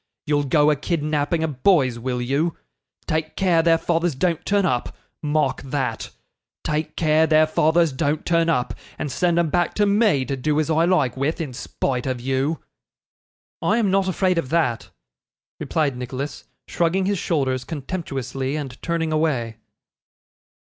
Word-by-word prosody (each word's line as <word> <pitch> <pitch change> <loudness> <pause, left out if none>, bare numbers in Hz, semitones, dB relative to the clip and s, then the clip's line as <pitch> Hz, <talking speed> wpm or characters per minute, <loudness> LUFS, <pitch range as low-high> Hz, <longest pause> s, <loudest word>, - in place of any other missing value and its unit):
You'll 145 -1 +1
go 150 +2 +4
a - - +2
kidnapping 155 +1 -1
of 145 -5 -4
boys, 135 -12 +3
will 125 0 -2
you? 145 +7 0 0.5
Take 155 -1 -2
care 180 -4 +3
their 165 0 +4
fathers 165 -2 0
don't 170 +3 0
turn 200 -1 +2
up 125 -8 -1 0.2
mark 150 -3 0
that 135 -1 -3 0.5
take 150 +1 -2
care 160 0 +3
their 155 0 +5
fathers 160 +1 +2
don't 145 +3 -1
turn 165 -1 +2
up, 125 -7 0 0.2
and 150 -3 -3
send 175 +2 +1
'em 170 -3 +1
back 175 -1 +1
to 210 - +3
me 200 - +3
to 135 - -2
do 150 +3 0
as 155 +1 0
I 160 +1 +3
like 150 -9 +2
with, 140 +6 -1
in 150 -6 -4
spite 125 +1 -3
of 130 -2 -2
you.' 135 +5 0 1.0
'I 215 - +2
am 210 -5 +2
not 195 0 +2
afraid 185 -1 +1
of 130 - -4
that,' 150 -8 0 0.7
replied 150 -5 0
Nicholas, 130 +3 -5 0.2
shrugging 175 +3 +1
his 200 -1 0
shoulders 130 -7 0
contemptuously, 135 -3 -4
and 140 -4 -6
turning 165 -1 -1
away. 130 -8 0
155 Hz, 160 wpm, -22 LUFS, 135-170 Hz, 1.0 s, their